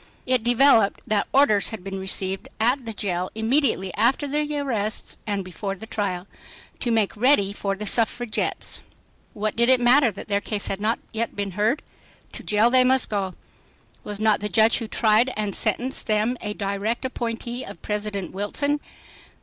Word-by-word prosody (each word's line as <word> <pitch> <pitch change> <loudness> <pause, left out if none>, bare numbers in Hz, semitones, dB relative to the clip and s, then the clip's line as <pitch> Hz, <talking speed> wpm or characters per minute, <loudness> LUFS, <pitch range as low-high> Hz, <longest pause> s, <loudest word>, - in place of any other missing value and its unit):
It 255 -2 +2
developed 240 -3 +4
that 210 -1 0
"orders" 240 -8 +4
had 220 -5 -7
been 195 0 -5
received 190 0 -2
at 245 +3 +1
the - - -3
jail 185 -4 -2
immediately 220 -5 +1
after 260 +5 +2
the 295 +1 -1
arrests 225 -7 -2
and 200 -2 -2
before 195 +2 -5
the 195 - -9
trial, 190 -5 -3 0.5
"to 240 - -2
make 220 -3 +1
ready 215 -4 +3
for 195 -1 -2
the 210 +2 -6
suffragettes." 230 +2 0 0.5
What 215 0 -2
did 235 +1 +2
it 260 -1 +5
matter 245 +2 +5
that 195 - -10
their 200 -1 0
case 205 -1 0
had 195 - -3
not 220 +2 +1
yet 230 +1 -3
been 200 -1 -3
heard? 215 - 0 0.5
To - - -7
jail 215 +2 +3
they 255 0 +5
must 260 0 +3
go. 195 -3 -2 0.7
Was 205 -1 -5
not 215 -1 +3
the 210 - -3
judge 220 +5 +4
who 230 - -5
tried 220 +2 +3
and 210 -2 -2
sentenced 260 +2 +1
them 215 +3 +1
a 210 -1 -4
direct 200 +5 -2
appointee 240 0 -4
of - - -11
President 210 -2 -3
Wilson? 285 +9 -1
215 Hz, 175 wpm, -24 LUFS, 200-245 Hz, 0.7 s, it